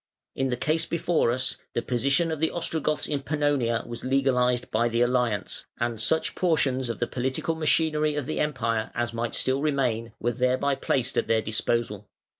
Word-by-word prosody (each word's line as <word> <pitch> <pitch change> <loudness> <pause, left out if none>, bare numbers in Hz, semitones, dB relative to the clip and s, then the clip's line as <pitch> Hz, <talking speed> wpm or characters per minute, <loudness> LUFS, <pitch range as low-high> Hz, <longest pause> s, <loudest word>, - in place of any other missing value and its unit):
In 135 0 -1
the 125 - -1
case 160 +5 0
before 170 -5 +1
us 125 +2 0 0.2
the 120 - 0
position 140 +7 +1
of 160 - -3
the 160 +1 +2
Ostrogoths 155 -3 -1
in 145 -2 -2
Pannonia 145 -6 0
was 120 0 -6
legalised 125 -2 +1
by 120 +2 +2
the 115 +1 0
alliance, 120 -3 0
and 120 -2 -1
such 160 +7 +2
portions 135 -8 +1
of 115 - -3
the 120 - 0
political 130 +6 -2
machinery 155 -1 +1
of 145 -3 -2
the 155 - -3
Empire 115 -7 0
as 120 -1 -1
might 115 0 -2
still 130 +1 +1
remain 125 -7 0
were 120 - 0
thereby 130 +3 +1
placed 130 -1 0
at - - -2
their 110 -1 +2
disposal. 110 -1 -1
130 Hz, 180 wpm, -26 LUFS, 120-150 Hz, 0.2 s, the